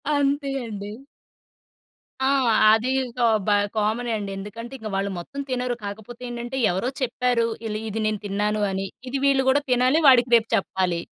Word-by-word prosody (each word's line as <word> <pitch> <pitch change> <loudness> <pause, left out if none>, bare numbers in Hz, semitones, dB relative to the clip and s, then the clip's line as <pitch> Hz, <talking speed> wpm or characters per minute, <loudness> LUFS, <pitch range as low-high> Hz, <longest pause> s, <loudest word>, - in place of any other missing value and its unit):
అంతే 285 0 +1 0.2
అండి. 205 -2 -6 1.4
ఆ! - - +3 0.4
అది 225 +4 +2
ఇంకా 245 -1 -1 0.2
బ - - +3 0.3
కామనే 225 +3 0
అండి. 200 -1 -5
ఎందుకంటే 230 +5 -8
ఇక 220 -2 -7
వాళ్ళు 195 0 -1
మొత్తం 280 +11 -8
తినరు. 250 -1 -1
కాకపోతే 220 +4 -8
ఏంటంటే 240 +2 -5
ఎవరో 190 +8 -1
చెప్పారు. 245 -1 +1 0.2
ఈళ్ళు 215 -1 -3
"ఇది 220 +1 -3
నేను 215 -1 -1
తిన్నాను" 210 +1 -1
అని. 195 0 -3 0.2
ఇది 275 - -2
వీళ్ళు 270 -1 +3
గూడా 285 +2 +3
తినాలి 255 +6 +3
వాడికి 250 -2 +6
రేపు 225 -1 +3
చెప్పాలి. 185 -3 -1
230 Hz, 155 wpm, -24 LUFS, 210-250 Hz, 1.4 s, వాడికి